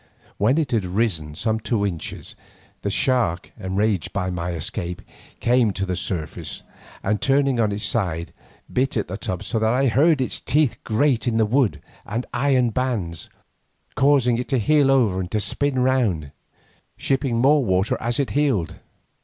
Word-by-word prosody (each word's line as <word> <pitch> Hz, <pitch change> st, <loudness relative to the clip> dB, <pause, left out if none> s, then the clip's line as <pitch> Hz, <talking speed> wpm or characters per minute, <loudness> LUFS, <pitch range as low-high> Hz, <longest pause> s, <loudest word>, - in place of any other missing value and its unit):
When 115 Hz, +8 st, +3 dB
it 150 Hz, -5 st, 0 dB
had 115 Hz, -4 st, +1 dB
risen 90 Hz, -6 st, -1 dB
some 110 Hz, +5 st, 0 dB
two 110 Hz, -2 st, 0 dB
inches, 85 Hz, -5 st, -4 dB, 0.5 s
the 100 Hz, -, -1 dB
shark, 115 Hz, -5 st, +1 dB
enraged 100 Hz, 0 st, -1 dB
at 90 Hz, -1 st, -1 dB
my 85 Hz, 0 st, -3 dB
escape, 85 Hz, +2 st, -4 dB, 0.4 s
came 120 Hz, -2 st, +3 dB
to 100 Hz, -, -2 dB
the 90 Hz, -1 st, -2 dB
surface, 90 Hz, -3 st, -4 dB, 0.4 s
and 105 Hz, +1 st, 0 dB
turning 135 Hz, -2 st, +2 dB
on 110 Hz, -2 st, +2 dB
its 100 Hz, +1 st, -4 dB
side, 85 Hz, -7 st, -1 dB, 0.4 s
bit 130 Hz, 0 st, +1 dB
at 105 Hz, -, -1 dB
the 90 Hz, -, -5 dB
tub 90 Hz, -2 st, -4 dB
so 115 Hz, -, -1 dB
that 110 Hz, 0 st, +2 dB
I 130 Hz, +4 st, +2 dB
heard 145 Hz, +6 st, +4 dB
its 130 Hz, -, -1 dB
teeth 150 Hz, -3 st, +1 dB
grate 120 Hz, +1 st, +1 dB
on 115 Hz, -2 st, +1 dB
the 110 Hz, -, +4 dB
wood 110 Hz, -, +1 dB, 0.2 s
and 115 Hz, +4 st, -3 dB
iron 130 Hz, -4 st, +2 dB
bands, 110 Hz, -10 st, -2 dB, 0.6 s
causing 130 Hz, -4 st, +3 dB
it 125 Hz, -, -3 dB
to 135 Hz, -, +2 dB
heel 140 Hz, +4 st, +3 dB
over 115 Hz, -9 st, +3 dB
and 90 Hz, -1 st, -3 dB
to 105 Hz, -, 0 dB
spin 140 Hz, +5 st, 0 dB
round, 110 Hz, -, +1 dB, 0.7 s
shipping 135 Hz, -3 st, 0 dB
more 140 Hz, +4 st, +4 dB
water 95 Hz, -1 st, +1 dB
as 120 Hz, +2 st, -1 dB
it 135 Hz, -7 st, 0 dB
heeled. 130 Hz, -, 0 dB
115 Hz, 170 wpm, -22 LUFS, 95-130 Hz, 0.7 s, heard